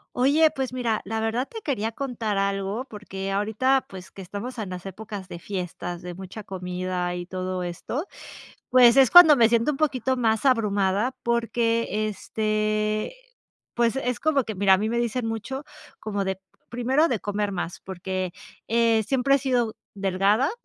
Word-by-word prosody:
Oye, 295 +5 +4
pues 260 -2 -3
mira, 235 -4 -1
la 220 +3 -2
verdad, 225 +4 -1
te 450 -1 -8
quería 225 -6 -1
contar 230 -5 -3
algo, 195 +4 -1
porque 195 -3 -6
ahorita 220 +7 +1
pues 185 -1 -10
que 195 - -10
estamos 205 +7 -6
en 205 -4 -4
las 180 0 -7
épocas 200 0 -7
de 175 - -8
fiestas 180 -2 -5
de 180 0 -6
mucha 190 +4 -9
comida 180 -1 -3
y 175 0 -5
todo 185 0 -3
esto, 180 - -4 0.6
pues 250 0 +7
es 265 -3 +7
cuando 350 -4 +10
me 230 -4 +5
siento 235 +4 +2
un 280 - -5
poquito 260 -4 +1
más 225 -1 +1
abrumada, 210 -1 +2
porque, 230 -1 +1 0.2
este 215 - -1 0.6
pues 235 0 +1
es 250 -2 -2
como 295 -3 +2
que 220 - -5
mira, 195 0 +4
a - - +5
mí 215 +3 -1
me 235 +1 0
dicen 240 0 -1
mucho 230 +5 -4 0.4
como 205 -2 -2
de, 190 -1 -3 0.3
primero 260 +7 +2
de 240 -9 -1
comer 205 0 -2
más, 175 -2 -4
porque, 185 -1 -4 0.4
eh, 230 -1 +3
siempre 270 +1 +3
he - - +3
sido 245 -4 0 0.2
delgada 200 - +2
220 Hz, 170 wpm, -25 LUFS, 195-250 Hz, 0.6 s, cuando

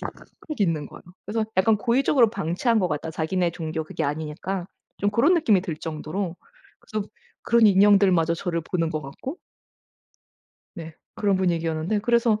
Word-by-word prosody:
쫙 - - -4 0.5
있는 165 -7 +1
거예요. - - -12 0.2
그래서 215 +2 -1
'약간 210 +3 +4
고의적으로 245 +2 +3
방치한 225 +3 0
것 180 - +1
같다. 150 +1 -3
자기네 170 +2 -1
종교 160 -1 -4
그게 160 - -4
아니니까.' 160 +5 -3 0.3
좀 205 - +1
고런 235 - +3
느낌이 220 - +3
들 175 -5 -4
정도로 165 +3 -4 0.4
그래서 215 -1 -5 0.4
그런 235 -1 +4
인형들마저 195 -4 +5
저를 170 -1 -2
보는 165 0 -1
것 155 -2 -3
같고 255 - -7 1.4
네. 165 -3 -8 0.2
그런 200 -2 +1
분위기였는데 170 +1 0
그래서 235 -1 +2
185 Hz, 350 characters per minute, -24 LUFS, 160-215 Hz, 1.4 s, 인형들마저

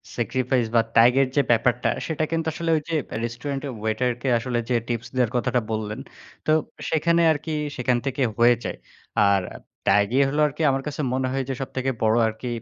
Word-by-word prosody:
Sacrifice, 125 0 0
বা 115 - +6
ত্যাগের 125 +4 +5
যে 140 - +5
ব্যাপারটা। 120 +1 +2 0.2
সেটা 155 -1 -1
কিন্তু 165 -1 -1
আসলে 165 +1 -3
ওই - - -2
যে 165 - 0 0.3
রেস্টুরেন্টে 135 +4 -4
ওয়েটার 110 +3 0
কে 135 - -3
আসলে 120 0 -2
যে 125 - +2
টিপস 120 0 -3
দেয়ার 125 -3 +2
কথাটা 125 0 +1
বললেন, 105 -1 -3 0.5
তো 155 - +2 0.4
সেখানে 170 +2 +2
আরকি 155 +1 -3 0.2
সেখান 125 -1 +1
থেকে 135 0 -2 0.2
হয়ে 120 +1 +5
যায়। - - -4 0.5
আর 100 -1 +3 0.4
ত্যাগই 105 +7 +3
হলো 145 +2 -2
আরকি 150 +3 -6
আমার 135 0 -2
কাছে 150 +1 -3
মনে 130 0 0
হয় 135 0 -1
যে - - 0
সবথেকে 130 0 -2
বড় 110 +1 +3
আরকি। 110 +3 -5
125 Hz, 180 wpm, -24 LUFS, 120-140 Hz, 0.5 s, বা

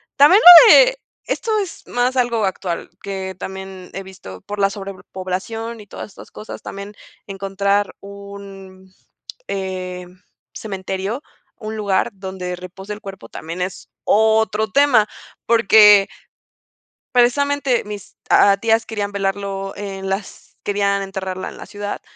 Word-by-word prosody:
También 325 +9 +7 0.3
lo - - +10
de, - - +6 0.3
esto 450 - -2
es 385 -5 -5
más 245 +1 0
algo 240 -4 +1
actual, 185 -2 -4
que 190 -1 -5
también 190 -1 -8
he 195 - -5
visto 180 - -11
por 205 0 -6
la 195 0 +3
sobrepoblación 195 +3 -6
y - - -13
todas - - -8
estas - - -14
cosas, 215 - -9
también 200 +1 -8 0.3
encontrar 200 +1 -1
un, 195 -2 -12 0.6
eh, 185 -2 -4 0.5
cementerio, 195 +3 -4 0.4
un 215 0 -6
lugar 205 +1 0
donde 190 -2 -6
repose 185 +3 -9
el 210 - -10
cuerpo, 195 0 -10
también 165 +3 -7
es 180 +1 -5 0.2
otro 220 0 +2
tema, 275 -6 +4 0.4
porque 210 -3 +6 1.1
precisamente 260 +1 +2
mis 205 -1 -9
ah, 200 -1 +6
tías 225 +1 +2
querían 205 -2 -4
velarlo 195 0 -3
en 195 -1 -6
las 195 +1 -5 0.2
querían 200 -1 0
enterrarla 190 -1 -5
en - - -10
la - - -8
ciudad, 205 0 -6
200 Hz, 130 wpm, -19 LUFS, 190-220 Hz, 1.1 s, lo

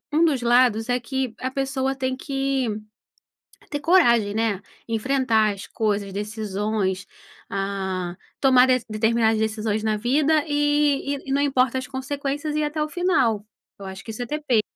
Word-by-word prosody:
Um 320 +3 +4
dos 275 -7 +1
lados 240 -1 +3
é 245 - +2
que 260 -1 -3
a 260 - -2
pessoa 270 0 -1
tem 260 -1 -2
que 270 -2 -1 1.0
ter 290 -1 -2
coragem, 235 - +4
né, 220 -3 0 0.3
enfrentar 225 -2 +2
as 195 - -9
coisas, 205 -2 -1
decisões, 205 -2 -2 0.4
ah, 190 -2 -3 0.2
tomar 260 -2 +6
de 255 0 +4
determinadas 220 +1 +2
decisões 220 -1 -1
na 215 -1 +1
vida 290 +7 +2
e 290 -1 +1
e 275 - -9
e - - +1
não 280 - +2
importa 260 -3 +2
as 260 - -5
consequências 280 +3 -3
ir 305 - +1
até 300 +1 -1
o 300 - -1
final. 265 - +1 0.3
Eu 200 - -8
acho 190 0 -8
que 225 - -7
isso 230 - -5
é - - -3
ter 300 +5 -4
peito. 235 -6 +3
250 Hz, 165 wpm, -23 LUFS, 215-275 Hz, 1.0 s, tomar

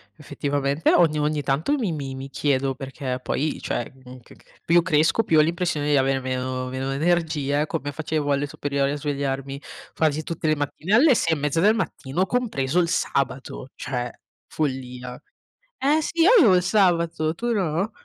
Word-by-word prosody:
Effettivamente 145 -1 -1
ogni 155 -3 +4
ogni 150 0 0
tanto 145 - 0
mi 230 -10 -1
mi 140 -4 -5
mi 135 +1 -7
chiedo, 135 -2 0
perché 135 -1 -5
poi 150 +4 -2
cioè, 120 - -3
mhmm, 130 -1 -14
c 120 - -18
che - - -25
più 170 +1 +4
cresco, 165 +6 +2
più 160 -5 +3
ho - - +8
l'impressione 165 -2 -1
di 145 - +4
avere 135 0 +2
meno 130 0 -3
meno 130 +1 -3
energia, 150 -2 0
come 150 -3 -4
facevo 150 0 -2
alle 140 +1 +1
superiori 140 -1 -1
a 145 - -2
svegliarmi 140 -1 -3 0.4
quasi 155 -1 +1
tutte 165 0 -6
le 155 - +3
mattine 150 +6 -3
alle 260 +2 +6
6 165 - +1
e - - -6
mezza 150 +3 0
del 210 +4 +5
mattino, 180 -5 -2
compreso 180 - -1
il 170 - +1
sabato, 135 -3 -2
cioè 125 -2 -4 0.4
follia. 125 -4 -4 0.6
Eh 290 +4 +2
sì, 330 +2 0
io 360 - +6
avevo 225 - +6
il 180 - +3
sabato, 170 -5 +1
tu 240 +6 -2
no? 190 0 0
150 Hz, 175 wpm, -23 LUFS, 135-170 Hz, 0.6 s, ho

